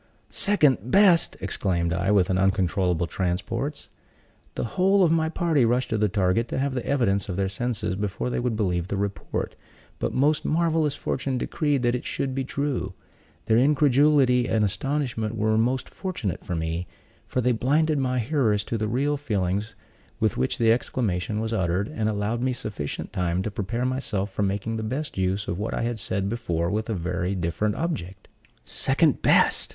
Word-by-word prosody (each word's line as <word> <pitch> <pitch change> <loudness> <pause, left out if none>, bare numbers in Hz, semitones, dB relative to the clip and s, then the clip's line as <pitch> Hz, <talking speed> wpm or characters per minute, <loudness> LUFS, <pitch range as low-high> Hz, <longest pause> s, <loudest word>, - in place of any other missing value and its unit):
"Second 155 - +3
best!" 185 -1 +5
exclaimed 90 -3 0
I, 90 +3 0
with 95 -3 +3
uncontrollable 95 -2 +1
transports. 100 - -3 0.7
The - - -2
whole 195 +1 +4
of 170 - +4
my 160 -1 +2
party 160 -5 +1
rushed 120 +2 +1
to 110 - +1
the 105 -1 +2
target 100 +3 +1
to - - -4
have 135 0 0
the 125 -2 -2
evidence 100 -8 +1
of 90 - -2
their 95 +1 0
senses 105 -2 -2
before 105 +5 -3
they - - -1
would 120 -2 -1
believe 90 -5 0
the 100 - -2
report; 100 0 -3 0.5
but - - -1
most 145 +4 +2
marvelous 160 -2 +1
fortune 135 -1 -2
decreed 145 0 0
that 120 0 +2
it 125 - -2
should 135 -1 -2
be 135 0 -1
true. 130 -9 -2 0.5
Their 110 - +3
incredulity 140 -2 +4
and 110 -1 +2
astonishment 115 +1 -2
were 110 +1 +2
most 125 +4 +1
fortunate 165 - -4
for 90 - -3
me; 80 +2 -2 0.4
for - - -2
they 125 0 +2
blinded 150 +6 +2
my 130 -1 0
hearers 115 -5 +1
to 115 +2 -3
the 110 - 0
real 140 +6 0
feelings 105 -5 -2 0.4
with - - +1
which 65 +1 -1
the 115 -1 +4
exclamation 110 -3 -1
was 110 +1 -2
uttered, 95 -1 0
and 110 -1 -1
allowed 110 +3 -1
me 130 0 +1
sufficient 105 -11 -5
time 90 0 0
to 110 - -3
prepare 110 +5 -2
myself 110 -7 -2
for 100 - -3
making 100 +3 -1
the - - -3
best 130 +8 -4
use 95 +2 -1
of 85 - -3
what 105 - -2
I - - -1
had 120 -1 -2
said 100 -1 -2
before 85 -7 -1
with 110 +2 -2
a 110 - 0
very 90 +1 -2
different 95 +5 -1
object. 100 - -4 0.4
"Second - - +1
best!" - - +3
110 Hz, 180 wpm, -25 LUFS, 95-130 Hz, 0.7 s, best